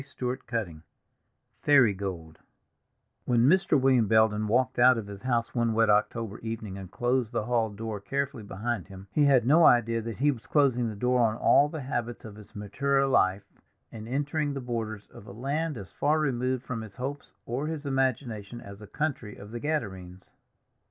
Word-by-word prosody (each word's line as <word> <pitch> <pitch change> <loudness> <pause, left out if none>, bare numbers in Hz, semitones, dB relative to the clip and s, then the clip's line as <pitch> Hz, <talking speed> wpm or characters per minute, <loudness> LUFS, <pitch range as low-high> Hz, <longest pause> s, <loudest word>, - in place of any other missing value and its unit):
Fairy 145 +1 -16
Gold 115 -9 -3 0.8
Fairy 135 -8 +5
Gold 90 -5 -6 0.9
WHEN 120 -2 +2
Mr. 175 0 +4
William 130 -4 +3
Belden 110 0 +3
walked 130 +3 +1
out 125 0 +6
of 110 - -4
his 100 -1 -9
house 120 -2 -1
one 115 -2 0
wet 115 -1 +4
October 105 +1 0
evening 110 -3 -5
and 95 -2 -8
closed 120 +3 0
the 115 - -1
hall 115 -2 +1
door 105 0 -5
carefully 140 +3 -3
behind 105 0 -4
him, 95 -1 -11
he 150 +4 +3
had 135 -4 +4
no 155 +6 +5
idea 115 -4 +4
that 115 0 -6
he 145 +3 +3
was 120 -5 -9
closing 130 -5 +2
the 110 - -6
door 125 +4 +1
on 110 -1 +2
all 145 +4 +4
the 155 -1 -6
habits 120 -3 -4
of 105 -2 -9
his 105 -1 -15
maturer 135 +7 0
life 100 -7 +2 0.5
and 110 0 -9
entering 145 +3 -1
the - - -3
borders 115 -4 -4
of 100 - -13
a - - -9
land 140 +7 -2
as 95 -5 -9
far 150 +2 +1
removed 130 -3 -1
from 115 -3 -5
his 110 -3 -10
hopes 135 +3 -6
or 130 +6 -3
his 155 -2 -5
imagination 125 -5 -2
as 100 -2 -11
the 105 - -11
country 135 -8 -3
of 105 +1 -12
the 120 - -5
Gadarenes. 95 - -4
120 Hz, 185 wpm, -28 LUFS, 105-135 Hz, 0.9 s, out